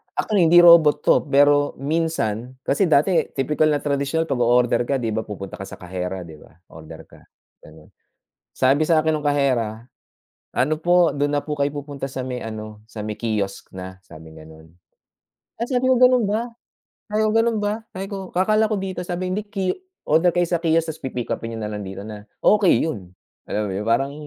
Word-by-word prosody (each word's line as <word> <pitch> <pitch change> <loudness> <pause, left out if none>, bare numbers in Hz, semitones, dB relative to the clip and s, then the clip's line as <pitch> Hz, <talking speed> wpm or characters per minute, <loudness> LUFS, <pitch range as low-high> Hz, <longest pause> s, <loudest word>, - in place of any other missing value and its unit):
actually 195 -6 +2
hindi 175 +1 +7
robot 160 -4 +7
'to, - - +3
pero 145 +1 +3
minsan 135 -6 -2
kasi, 180 +6 +1
dati, 160 +4 +3
tipikal 150 +3 +1
na 145 -1 0
tradisyon, 140 +2 0
kapag 135 -6 -3
o-order 120 0 +3
ka, 140 - +1
hindi 120 -4 -2
ba, 110 +1 -3
pupunta 100 -2 -8
ka - - -7
sa - - -9
kahera, 90 +1 -5
hindi 80 -3 -12
ba, - - -19 0.2
o-order 80 -1 -11
ka, - - -19 0.4
ganoon. 75 0 -17 0.6
Sabi 135 +4 +2
sa 165 -1 +4
akin 160 0 +1
nung 150 -1 -4
kahera, 125 -6 0 0.7
"Ano 150 +5 +1
po, 175 0 +4
doon 145 0 0
na - - -3
po 150 - -2
kayo 140 0 +1
pupunta 140 -1 -6
sa 130 -1 -5
may 125 -1 -4
ano, 110 -1 -8
sa 110 -2 -7
may 105 - -3
kiosk 105 -4 -3
na," 95 0 -8
sabing 80 0 -13
ganoon. 80 +1 -15 0.9
Ay, - - +1
sabi 255 -1 0
ko, 260 - +4
"Ganoon 250 -2 +5
ba?" 225 +4 -1 0.6
Sabi 215 +1 +1
ko, - - +2
"Ganoon 225 0 +2
ba?" 205 0 0 0.2
Sabi 190 +1 -5
ko, 200 - -5 0.2
"Kakala 215 +4 +2
ko - - +2
dito." 190 -1 -5
Sabi, 180 +1 -3
"Hindi 210 +2 -2
ki 195 -3 -2 0.4
oorder 165 +3 +4
kayo 175 - +3
sa 170 -2 0
kiosk, 165 -1 +1
tas 155 - -14
pipick-upin 120 -3 -4
niyo 115 - -6
na 105 - -3
lang 105 -1 -5
dito 95 +1 -7
na." 105 -1 -9 0.2
Okey 205 -3 +4
iyon, 100 - -6 0.3
alam 105 0 -2
mo - - -3
iyon, 105 +2 -4
parang 135 +5 +1
140 Hz, 200 wpm, -22 LUFS, 110-170 Hz, 0.9 s, hindi